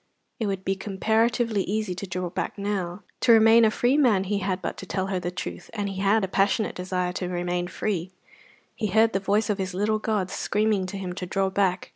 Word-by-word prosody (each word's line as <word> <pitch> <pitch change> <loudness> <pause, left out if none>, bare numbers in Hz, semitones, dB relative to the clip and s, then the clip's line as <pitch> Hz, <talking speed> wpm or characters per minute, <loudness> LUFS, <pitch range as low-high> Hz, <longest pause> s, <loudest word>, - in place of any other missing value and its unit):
It 220 - -1
would 195 -1 -3
be 195 - +1
comparatively 220 +3 +1
easy 210 0 -2
to 185 +2 -6
draw 180 0 -3
back - - -3
now. 200 -2 -3 0.2
To 240 - +4
remain 225 +1 +7
a 220 - +6
free 245 +5 +2
man 230 -10 +4
he 200 +1 -1
had 190 -1 -1
but - - -4
to 190 - -8
tell 190 +1 -1
her 185 - 0
the 175 - -3
truth; 180 - -6
and 205 -2 -1
he 190 -1 -4
had 205 +2 +3
a - - 0
passionate 200 +3 +1
desire 180 -1 -2
to 180 -1 -3
remain 175 0 -2
free. 185 -1 -2 0.7
He 215 - -1
heard 220 +3 +3
the 195 - +1
voices 205 +2 +1
of 205 - -2
his 190 -1 -3
little 215 +3 +1
gods 205 -4 -1
screaming 210 -2 0
to 195 - -5
him 185 -2 -4
to 180 0 -5
draw 190 +1 0
back. 190 -2 0
195 Hz, 225 wpm, -25 LUFS, 185-215 Hz, 0.7 s, remain